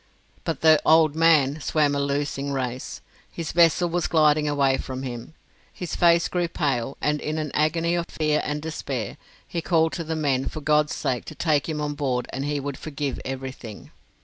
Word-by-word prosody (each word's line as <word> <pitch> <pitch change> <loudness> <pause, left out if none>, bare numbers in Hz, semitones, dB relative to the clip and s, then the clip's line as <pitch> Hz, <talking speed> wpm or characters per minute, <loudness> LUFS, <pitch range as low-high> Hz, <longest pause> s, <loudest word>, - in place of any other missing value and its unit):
But 165 - -2
the 155 -1 +6
"old 160 -2 +5
man" 155 -3 +4
swam 150 -1 +1
a 140 - 0
losing 140 0 -2
race. 130 -2 -4 0.3
His 165 -3 -5
vessel 170 +1 +4
was 175 0 -1
gliding 150 -2 +3
away 140 -2 +2
from 130 0 -5
him: 125 +4 -7 0.4
his 180 - -5
face 170 -1 +4
grew 175 -1 -1
pale, 135 -6 -2
and 150 0 0
in 155 +1 -3
an 155 -2 -3
agony 165 +3 +1
of 170 -1 -1
fear 155 -1 0
and 150 0 -3
despair, 135 -8 -4 0.3
he 170 - -3
called 160 -1 +2
to 170 - -3
the 160 0 -3
men 135 -4 0
for - - -6
God's 150 0 +2
sake 125 -2 -2
to 155 - -9
take 155 -2 +1
him 155 -1 -2
on 150 0 -2
board 130 -4 -1
and 135 +2 -3
he 145 0 -1
would 140 -1 -5
forgive 145 -2 -4
everything. 130 -5 -7
150 Hz, 190 wpm, -24 LUFS, 135-160 Hz, 0.4 s, the